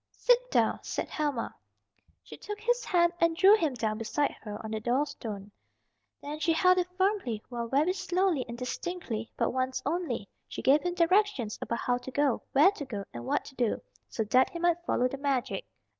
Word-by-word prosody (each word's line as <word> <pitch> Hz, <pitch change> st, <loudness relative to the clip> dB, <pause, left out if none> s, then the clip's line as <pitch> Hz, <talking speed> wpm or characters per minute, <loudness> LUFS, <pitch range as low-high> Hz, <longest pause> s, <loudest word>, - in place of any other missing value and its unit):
"Sit -, -, +3 dB
down," -, -, +2 dB
said -, -, -4 dB
Helma. 290 Hz, -6 st, -2 dB, 0.7 s
She -, -, -11 dB
took 420 Hz, 0 st, -7 dB
his 485 Hz, +3 st, +1 dB
hand 345 Hz, -1 st, +3 dB
and 335 Hz, -1 st, +3 dB
drew 395 Hz, +3 st, +8 dB
him 315 Hz, -10 st, 0 dB
down 215 Hz, -2 st, -2 dB
beside 225 Hz, +6 st, 0 dB
her 210 Hz, -1 st, -6 dB
on 220 Hz, -, -5 dB
the 220 Hz, -, -2 dB
door 245 Hz, +6 st, +1 dB
stone. 205 Hz, -7 st, -7 dB, 0.7 s
Then 295 Hz, +1 st, -5 dB
she 325 Hz, +2 st, +2 dB
held 365 Hz, +2 st, +4 dB
it 360 Hz, -, 0 dB
firmly 380 Hz, -, 0 dB
while 235 Hz, -2 st, -4 dB
very 295 Hz, +9 st, +2 dB
slowly 365 Hz, -6 st, 0 dB
and 235 Hz, -, -6 dB
distinctly, 250 Hz, -3 st, -4 dB
but -, -, 0 dB
once 260 Hz, 0 st, -1 dB
only, 290 Hz, -, -2 dB, 0.2 s
she -, -, -7 dB
gave 280 Hz, +3 st, +5 dB
him 355 Hz, 0 st, -2 dB
directions 350 Hz, -, +2 dB
about 235 Hz, -, -2 dB
how 245 Hz, 0 st, +1 dB
to 255 Hz, -, -8 dB
go, 280 Hz, -1 st, +1 dB
where 300 Hz, +8 st, +6 dB
to 400 Hz, -, -7 dB
go 205 Hz, -6 st, -5 dB
and 120 Hz, 0 st, -7 dB
what -, -, 0 dB
to -, -, -11 dB
do, 240 Hz, -4 st, 0 dB, 0.3 s
so 225 Hz, -, -2 dB
that 255 Hz, +5 st, +3 dB
he -, -, -7 dB
might 345 Hz, 0 st, +1 dB
follow 250 Hz, -, +2 dB
the 270 Hz, +2 st, -6 dB
magic. 280 Hz, -, -1 dB
285 Hz, 200 wpm, -29 LUFS, 235-355 Hz, 0.7 s, drew